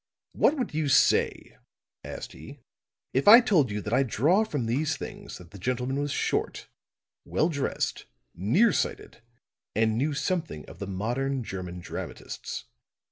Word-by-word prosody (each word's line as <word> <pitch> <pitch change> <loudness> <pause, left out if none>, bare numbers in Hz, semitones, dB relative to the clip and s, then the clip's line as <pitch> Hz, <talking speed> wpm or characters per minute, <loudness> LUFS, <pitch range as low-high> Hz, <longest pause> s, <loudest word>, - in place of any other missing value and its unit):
"What 305 - +3
would 250 - -2
you 155 -1 0
say," 135 - +2 0.4
asked - - -7
he, - - -12 0.5
"if 135 +7 +1
I 225 +4 +12
told 180 - +3
you 105 0 -3
that 105 - -4
I 130 - +4
draw 145 - +3
from 145 - -3
these 145 +6 0
things - - -8
that 90 -2 -14
the 100 - -11
gentleman 125 +5 -1
was 145 0 -1
short, - - -1 0.6
well 160 - +1
dressed, 140 -4 -2 0.3
near 135 - +3
sighted - - -3 0.5
and 110 +1 +2
knew 145 +2 0
something 165 +3 -2
of - - -13
the 100 - -5
modern 120 +7 -2
German 90 -4 -6
dramatists." - - -6
135 Hz, 150 wpm, -27 LUFS, 110-155 Hz, 0.6 s, I